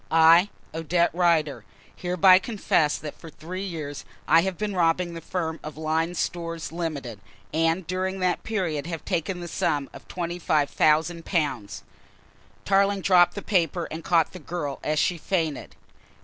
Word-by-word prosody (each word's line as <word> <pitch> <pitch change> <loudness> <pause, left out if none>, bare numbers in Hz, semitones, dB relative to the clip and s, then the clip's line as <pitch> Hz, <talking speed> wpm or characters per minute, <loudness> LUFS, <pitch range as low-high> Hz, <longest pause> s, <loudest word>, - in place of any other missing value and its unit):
"I, 165 +4 +6 0.2
Odette 170 +2 +1
Rider, 160 - +1 0.3
hereby 185 +1 +5
confess 190 -8 +1
that 150 -2 -8
for 165 - -10
three 175 +5 -7
years 155 -7 -5 0.2
I 165 - +6
have 190 -1 -2
been 210 -1 -2
robbing 170 0 +1
the 165 - -7
firm 160 -1 -3
of 155 0 -8
Lyne's 160 +2 -1
Stores, 165 -2 -3
Limited, 150 - -4 0.3
and 165 +3 +1
during 185 +2 -2
that 180 -1 0
period 170 -9 -2
have 165 -2 -5
taken 175 0 -2
the 175 - -6
sum 145 -3 -1
of - - -12
£25,000." 155 - 0 0.8
Tarling 200 0 +3
dropped 180 -2 +5
the 200 - -5
paper 175 -3 0
and 160 +1 -6
caught 165 -2 +2
the 185 - -8
girl 150 -4 -4
as 155 0 0
she 170 +3 +1
fainted. 160 -5 -2
165 Hz, 150 wpm, -25 LUFS, 155-180 Hz, 0.8 s, I